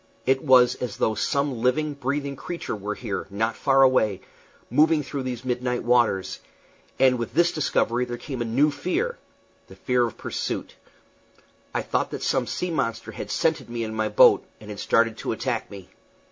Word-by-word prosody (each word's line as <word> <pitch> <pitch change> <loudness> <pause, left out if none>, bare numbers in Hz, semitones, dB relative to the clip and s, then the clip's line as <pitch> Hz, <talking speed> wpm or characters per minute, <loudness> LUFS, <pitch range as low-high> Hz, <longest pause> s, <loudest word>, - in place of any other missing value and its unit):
It 130 +1 +2
was 125 -3 +6
as 120 -5 -5
though 110 - +1
some 140 +1 -1
living, 150 +5 +1
breathing 140 +1 -3
creature 170 -3 -5
were 105 +1 -4
here, 105 -5 -4
not 110 +3 -1
far 135 0 +4
away, 110 -7 +3 0.5
moving 155 +4 +3
through 140 0 -4
these 125 -1 -5
midnight 125 0 -1
waters; 120 -6 +2 0.6
and 130 -2 +4
with 115 - -5
this 175 +1 +4
discovery 125 -5 0
there 120 -1 -5
came 130 -1 -6
a - - 0
new 135 +7 +2
fear 360 - -2 0.5
the - - -14
fear 125 -1 +1
of 115 - -10
pursuit. - - -4 1.0
I - - -2
thought - - -1
that - - -6
some - - +1
sea 180 -1 -3
monster 115 -8 -2
had - - -7
scented 160 -6 0
me 120 -1 -3
in 110 -1 -4
my 110 -1 -1
boat, 105 - +6 0.2
and 105 -1 -10
had 100 - -8
started 115 -1 +2
to - - -3
attack - - -3
me. 100 -3 -11
125 Hz, 180 wpm, -24 LUFS, 115-140 Hz, 1.0 s, was